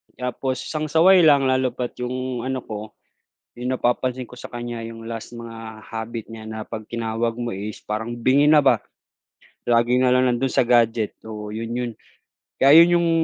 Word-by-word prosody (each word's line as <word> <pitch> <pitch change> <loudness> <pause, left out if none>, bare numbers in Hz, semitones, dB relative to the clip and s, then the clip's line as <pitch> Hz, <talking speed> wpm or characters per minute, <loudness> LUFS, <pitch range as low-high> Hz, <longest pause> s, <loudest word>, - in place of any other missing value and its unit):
Tapos 125 0 -3
isang 155 -1 -3
saway 180 +5 +6
lang 140 -2 +5
lalo 130 -1 +1
pa't 125 -1 -3
'yong 125 0 -3
ano 130 -1 -3
ko, 105 0 -8 0.7
'yong 125 +1 -1
napapansin 125 +1 -1
ko - - -19
sa - - -8
kanya 120 -1 -6
'yong 115 0 -8
last 115 +1 -7
mga 115 -2 -9
habit 115 0 -6
niya 110 -1 -9
na 110 -1 -6
'pag 110 -2 -8
tinawag 115 0 -2
mo 120 -1 -3
is 100 +2 -6
parang 110 +3 -4
bingi 135 +5 +3
na 150 -2 +6
ba. 125 -5 +4 0.9
Lagi 120 +1 +3
na 125 -1 +3
lang 125 0 +3
nando'n 130 +2 0
sa - - +4
gadget. 115 -2 +2
Oo 105 -1 -7
'yon 115 +2 -5
'yon. 125 -1 -2 0.7
Kaya, 135 +1 +5
ayun 175 +1 +6
'yong 170 -1 +2
120 Hz, 180 wpm, -22 LUFS, 115-130 Hz, 0.9 s, saway